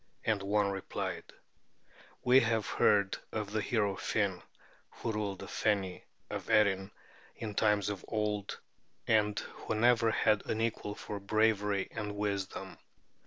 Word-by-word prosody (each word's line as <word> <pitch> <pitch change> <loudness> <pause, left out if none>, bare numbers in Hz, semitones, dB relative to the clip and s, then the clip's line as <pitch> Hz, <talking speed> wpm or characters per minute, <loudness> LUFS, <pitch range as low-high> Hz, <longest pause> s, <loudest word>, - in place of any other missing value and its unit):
And 110 -3 +1
one 100 0 +1
replied: 95 -1 -4 1.0
"We 125 +2 +7
have 115 -3 +1
heard 100 -2 +3
of 105 -2 -3
the 110 0 0
hero 105 -3 +1
Finn, 100 -3 -1 0.5
who 115 - -4
ruled 105 -3 -2
the - - -8
Feni 95 -4 -1 0.2
of - - -6
Erin 95 -2 +3 0.5
in 110 -2 -5
times 105 -2 +2
of 100 -3 -5
old, 105 -2 -2 0.5
and 105 -2 +3
who 110 - -4
never 115 +1 +4
had 110 -1 +2
an 110 - -1
equal 110 -2 -2
for 105 0 -6
bravery 105 -1 +2
and 105 -2 -4
wisdom. 100 -2 -3
105 Hz, 135 wpm, -32 LUFS, 100-110 Hz, 1.0 s, We